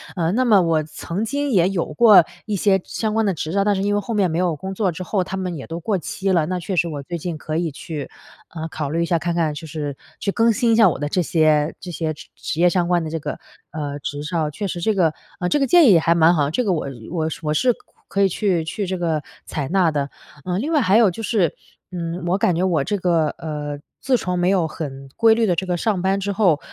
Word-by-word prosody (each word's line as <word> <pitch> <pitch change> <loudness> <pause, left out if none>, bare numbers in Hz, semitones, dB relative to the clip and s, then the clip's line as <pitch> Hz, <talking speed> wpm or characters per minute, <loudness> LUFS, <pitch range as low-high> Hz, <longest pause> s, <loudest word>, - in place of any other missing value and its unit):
呃， 170 -2 0
那 255 +4 +2
么 215 -5 +5
我 165 -2 +1
曾 170 +6 -5
经 285 +4 -1
也 185 -5 +4
有 190 -3 -1
过 205 -2 +7 0.2
一 210 - -1
些 190 -1 +2
相 220 -1 -3
关 220 0 +2
的 195 - +1
执 160 -1 -4
照， 200 0 +2
但 205 0 +2
是 190 - -1
因 205 0 +1
为 205 - +2
后 230 - -4
面 195 -4 +2
没 160 - -2
有 175 -3 +1
工 190 +6 -6
作 190 -2 0
之 175 +3 -6
后， 190 0 0
它 190 +1 -5
们 180 -2 -3
也 135 - -7
都 165 +1 -5
过 200 +3 0
期 195 +4 -2
了， 170 -4 +3
那 180 +1 -2
确 180 +2 -4
实 170 -1 +2
我 145 -3 -5
最 170 +5 -5
近 165 -1 -4
可 155 0 -5
以 165 -1 -1
去， 145 0 -6 0.5
呃， 160 0 -4
考 150 -3 -4
虑 165 +3 0
一 - - 0
下 170 -1 +1
看 170 +1 -2
看 160 -3 +1
就 150 +2 -8
是 145 -2 -4 0.2
去 200 - -1
更 230 +2 +3
新 230 +1 +2
一 - - +4
下 225 -1 +6
我 - - -3
的 145 - -2
这 180 +5 0
些 155 -2 +2
这 180 - -7
些 160 -2 -2
职 150 - -13
职 155 - -5
业 175 +1 +5
相 175 -1 +1
关 175 -1 +2
的 160 - -4
这 165 - -2
个， - - -5 0.3
呃， 145 -2 -4
执 145 +1 -5
照。 160 -2 -1
确 200 +7 -4
实 175 -1 -4
这 215 +4 +2
个 165 -5 +2 0.3
呃， 180 - -1
这 295 - +2
个 275 - +2
建 350 +1 +6
议 200 - +8
也 165 - +6
还 165 +1 +3
蛮 165 +1 +5
好， 145 -3 +1
这 250 - 0
个 190 - +2
我 160 - -2
呃， 140 - -5 0.2
我 160 -3 -1 0.2
我 150 - 0
是 250 +11 +3
可 - - -8 0.3
可 200 - 0
以 195 - +5
去 185 -3 0
去 200 +5 -3
这 185 0 -2
个 160 -4 -1 0.2
采 140 -3 -4
纳 180 -2 +3
的。 145 -2 -2 0.3
呃， 180 0 -2
另 300 +9 -2
外 300 - +4
还 195 0 +4
有 225 -3 +6
就 205 +6 -6
是， 200 -8 +1 0.4
嗯， 170 0 -4
我 185 - +2
感 185 -3 +2
觉 175 - 0
我 170 -6 +2
这 205 +7 -1
个， 170 -4 +2
呃， 145 -2 -5 0.2
自 265 -2 +2
从 180 -4 -2
没 175 +1 +2
有 185 -4 +2
很 135 -4 -7
规 225 -1 +5
律 225 0 +2
地 180 - +2
这 190 - -2
个 180 - -1
上 210 0 0
班 195 +1 +1
之 200 +1 -2
后， 190 -7 +3
175 Hz, 300 characters per minute, -21 LUFS, 160-200 Hz, 0.5 s, 议